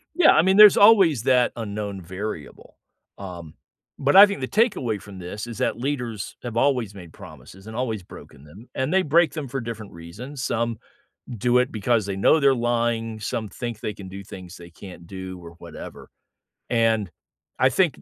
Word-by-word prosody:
Yeah, 355 Hz, -3 st, +6 dB
I 155 Hz, -, +4 dB
mean, 190 Hz, +2 st, +3 dB
there's 210 Hz, -2 st, +9 dB
always 195 Hz, -, +6 dB
that 125 Hz, -2 st, +3 dB
unknown 105 Hz, -3 st, -5 dB
variable. 90 Hz, -2 st, -8 dB, 0.4 s
Um, 85 Hz, -5 st, -9 dB, 0.4 s
but 140 Hz, +4 st, +1 dB
I 200 Hz, +1 st, +11 dB
think 200 Hz, -8 st, -5 dB
the 130 Hz, -, -3 dB
takeaway 135 Hz, -, 0 dB
from 100 Hz, -2 st, -11 dB
this 95 Hz, +5 st, -7 dB
is 115 Hz, -3 st, -8 dB
that -, -, 0 dB
leaders 125 Hz, -6 st, -4 dB
have 120 Hz, -2 st, -6 dB
always 125 Hz, -6 st, +1 dB
made 90 Hz, -5 st, -12 dB
promises 95 Hz, +2 st, -14 dB
and 110 Hz, -, -9 dB
always 115 Hz, -5 st, -3 dB
broken 70 Hz, -5 st, -14 dB
them, 95 Hz, +11 st, -15 dB
and 130 Hz, +5 st, -2 dB
they 190 Hz, -, +4 dB
break 165 Hz, +1 st, +3 dB
them 150 Hz, -5 st, -5 dB
for 135 Hz, +2 st, -4 dB
different 115 Hz, -3 st, -7 dB
reasons. 115 Hz, -, -9 dB
Some 115 Hz, -2 st, -2 dB, 0.6 s
do 125 Hz, +4 st, +2 dB
it 125 Hz, 0 st, +1 dB
because 110 Hz, 0 st, 0 dB
they 100 Hz, -1 st, -4 dB
know 130 Hz, +11 st, +4 dB
they're 140 Hz, -2 st, +4 dB
lying, 115 Hz, -2 st, -1 dB
some 110 Hz, 0 st, -4 dB
think 120 Hz, +1 st, -6 dB
they 105 Hz, -, -4 dB
can 100 Hz, -2 st, -11 dB
do 100 Hz, +1 st, -9 dB
things 90 Hz, -1 st, -11 dB
they 85 Hz, -1 st, -12 dB
can't 90 Hz, 0 st, -12 dB
do 95 Hz, 0 st, -8 dB
or 85 Hz, -, -10 dB
whatever, 85 Hz, -1 st, -11 dB, 0.6 s
and 115 Hz, -5 st, +1 dB, 0.5 s
I 130 Hz, -, +5 dB
think 170 Hz, +3 st, 0 dB
115 Hz, 185 wpm, -23 LUFS, 95-130 Hz, 0.6 s, I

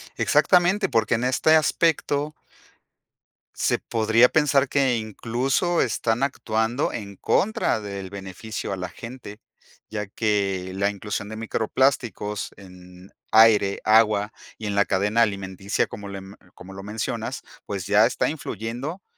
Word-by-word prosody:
Exactamente 185 Hz, +2 st, +3 dB
porque 115 Hz, 0 st, +2 dB
en 115 Hz, -, -2 dB
este 130 Hz, +5 st, +3 dB
aspecto 155 Hz, -1 st, +1 dB, 1.2 s
se -, -, +1 dB
podría 115 Hz, +2 st, +3 dB
pensar 145 Hz, -3 st, +3 dB
que 135 Hz, -2 st, +2 dB
incluso 120 Hz, -, 0 dB
están 115 Hz, +3 st, -1 dB
actuando 115 Hz, -1 st, -1 dB
en 100 Hz, -3 st, -7 dB
contra 210 Hz, -, +1 dB
del 100 Hz, -2 st, -6 dB
beneficio 100 Hz, +2 st, -6 dB
a -, -, -4 dB
la 90 Hz, -1 st, -5 dB
gente, 115 Hz, -1 st, -10 dB, 0.5 s
ya 105 Hz, -2 st, -3 dB
que 100 Hz, -3 st, -1 dB
la 100 Hz, +1 st, +1 dB
inclusión 105 Hz, 0 st, -5 dB
de 110 Hz, -, -6 dB
microplásticos 110 Hz, -1 st, -1 dB
en 90 Hz, -1 st, -15 dB, 0.2 s
aire, 110 Hz, -3 st, +5 dB
agua 110 Hz, -1 st, +3 dB, 0.2 s
y 110 Hz, -, -7 dB
en 105 Hz, -, -2 dB
la 100 Hz, 0 st, +3 dB
cadena 105 Hz, +4 st, +1 dB
alimenticia, 100 Hz, -2 st, -1 dB
como 100 Hz, 0 st, -9 dB
lem 95 Hz, 0 st, -8 dB, 0.2 s
como 95 Hz, +2 st, -12 dB
lo 95 Hz, -, -8 dB
mencionas, 105 Hz, +2 st, -4 dB, 0.3 s
pues 100 Hz, -3 st, -4 dB
ya -, -, +5 dB
está -, -, -1 dB
influyendo 135 Hz, -, -5 dB
110 Hz, 130 wpm, -24 LUFS, 100-125 Hz, 1.2 s, aire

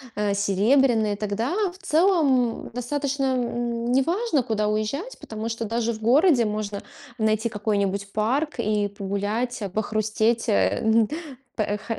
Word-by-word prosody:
а, 210 Hz, -1 st, 0 dB
серебряные, 215 Hz, +3 st, +2 dB
тогда 215 Hz, -, -2 dB, 0.2 s
в 360 Hz, -, -16 dB
целом 310 Hz, -10 st, +2 dB
достаточно, 275 Hz, +3 st, -2 dB
м, 240 Hz, -1 st, -2 dB
неважно, 320 Hz, -, +1 dB
куда 215 Hz, -2 st, -1 dB
уезжать, 215 Hz, -, -2 dB
потому 220 Hz, +1 st, -5 dB
что 230 Hz, 0 st, -3 dB
даже 230 Hz, +1 st, -1 dB
в 220 Hz, -, -8 dB
городе 260 Hz, +2 st, +4 dB
можно 210 Hz, -1 st, -3 dB, 0.3 s
найти 220 Hz, 0 st, +1 dB
какой-нибудь 200 Hz, -2 st, -1 dB
парк 260 Hz, +9 st, 0 dB
и 210 Hz, -1 st, +1 dB
погулять, 205 Hz, +5 st, -2 dB
а, 200 Hz, -, -3 dB
похрустеть, 215 Hz, +3 st, 0 dB
эн 220 Hz, -, +3 dB
п 300 Hz, -, -5 dB, 0.5 s
э 205 Hz, 0 st, -2 dB
х 225 Hz, +2 st, -5 dB
225 Hz, 135 wpm, -24 LUFS, 210-255 Hz, 0.5 s, городе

